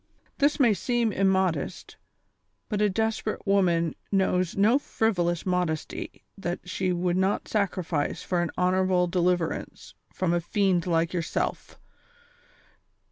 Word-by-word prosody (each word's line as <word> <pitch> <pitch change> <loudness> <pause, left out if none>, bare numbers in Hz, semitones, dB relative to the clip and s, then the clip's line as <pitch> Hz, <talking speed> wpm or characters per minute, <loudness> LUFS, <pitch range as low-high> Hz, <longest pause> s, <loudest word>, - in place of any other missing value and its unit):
This 285 +2 +2
may 240 -6 +5
seem 235 +3 0
immodest, 190 -3 0 0.7
but 210 -2 -1
a 210 - +4
desperate 220 +1 -2
woman 175 -5 +2 0.2
knows 185 -2 +1
no 220 +7 +4
frivolous 175 - 0
modesty 180 -4 -2 0.2
that 175 -1 -4
she 185 0 -1
would 175 0 0
not 190 +2 0
sacrifice 185 -7 -1
for 180 -2 0
an 175 - -1
honorable 185 0 +2
deliverance 175 -1 -1 0.2
from 180 -2 -1
a 175 - +1
fiend 185 -1 +1
like 165 0 +1
yourself. 170 -3 -3
185 Hz, 120 wpm, -26 LUFS, 175-200 Hz, 0.7 s, may